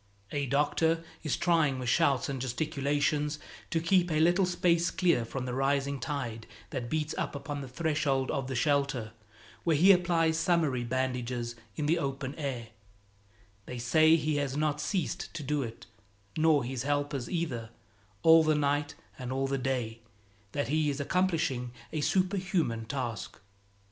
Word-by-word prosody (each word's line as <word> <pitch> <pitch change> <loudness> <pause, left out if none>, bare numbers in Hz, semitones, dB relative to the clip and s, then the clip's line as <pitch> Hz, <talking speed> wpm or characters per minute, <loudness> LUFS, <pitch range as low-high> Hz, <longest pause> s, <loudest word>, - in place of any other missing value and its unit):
A 145 -1 -1
doctor 160 +4 +2 0.2
is 155 - -1
trying 160 -6 +2
with 125 -1 -4
shouts 140 0 +3
and 135 -2 -3
gesticulations 145 +2 0 0.3
to 165 - +1
keep 175 +2 +3
a 155 -1 +1
little 175 +4 +4
space 175 -1 +2
clear 170 -10 +2
from 125 +3 -5
the 125 - -3
rising 140 +1 0
tide 120 -7 -4 0.2
that 120 -2 -4
beats 155 +1 -1
upon 145 0 -4
the 135 - -6
threshold 140 -1 0
of 135 -3 -2
the 130 - -3
shelter, 135 -4 +1 0.5
where 165 -2 +3
he 180 +7 +7
applies 170 -3 +3
summary 160 -7 +2
bandages 125 -1 -2 0.2
in 150 - -2
the 165 +3 +2
open 135 -2 -3
air; 125 -6 -4 1.0
they 125 - -5
say 155 +7 +5
he 155 -2 0
has 140 -1 -1
not 150 -1 0
ceased 180 +1 -2
to 155 - -4
do 145 +1 0
it, 115 -3 -7 0.5
nor 155 -3 +4
his 125 0 -3
helpers 145 -2 -1
either, 140 -10 -2 0.5
all 160 0 +8
the 155 -1 +3
night 145 +1 0 0.2
and 125 -1 -5
all 135 +1 0
the 135 0 -1
day, 125 -3 -2 0.5
that 145 -2 -1
he 155 0 +2
is 140 0 -2
accomplishing 150 -7 0 0.2
a 155 - -1
superhuman 185 - 0
task. 120 -3 -4
145 Hz, 155 wpm, -30 LUFS, 130-160 Hz, 1.0 s, all